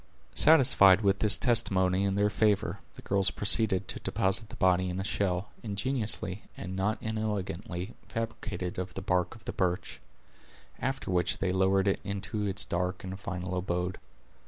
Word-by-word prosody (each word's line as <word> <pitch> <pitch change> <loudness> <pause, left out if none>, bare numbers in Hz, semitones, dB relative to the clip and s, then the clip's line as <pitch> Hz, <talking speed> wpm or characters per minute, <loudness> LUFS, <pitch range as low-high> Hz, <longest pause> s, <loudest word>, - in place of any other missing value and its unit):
Satisfied 120 - +6
with 100 -1 +2
this 105 -3 +5
testimony 95 -6 +2
in 100 0 0
their 105 +1 +1
favor, 105 -2 +1 0.2
the - - -12
girls 100 -1 +2
proceeded 105 -2 +3
to - - -3
deposit 95 +3 +1
the - - -9
body 95 0 +2
in 90 +1 -4
a - - -2
shell, 100 -2 -1
ingeniously, 105 -2 -2 0.2
and 95 -1 -6
not 100 +4 0
inelegantly, 100 -4 -4
fabricated 110 -5 -5
of 90 0 -6
the 95 - -5
bark 90 +3 0
of 110 - -17
the - - -4
birch; 90 -1 -2 0.8
after 130 -5 -3
which 90 -1 0
they 95 - -1
lowered 95 +1 +2
it 100 - +1
into 100 +1 -3
its 100 0 +1
dark 90 +1 -3
and 95 +1 -7
final 90 -3 -5
abode. 90 0 -2
95 Hz, 160 wpm, -29 LUFS, 95-105 Hz, 0.8 s, Satisfied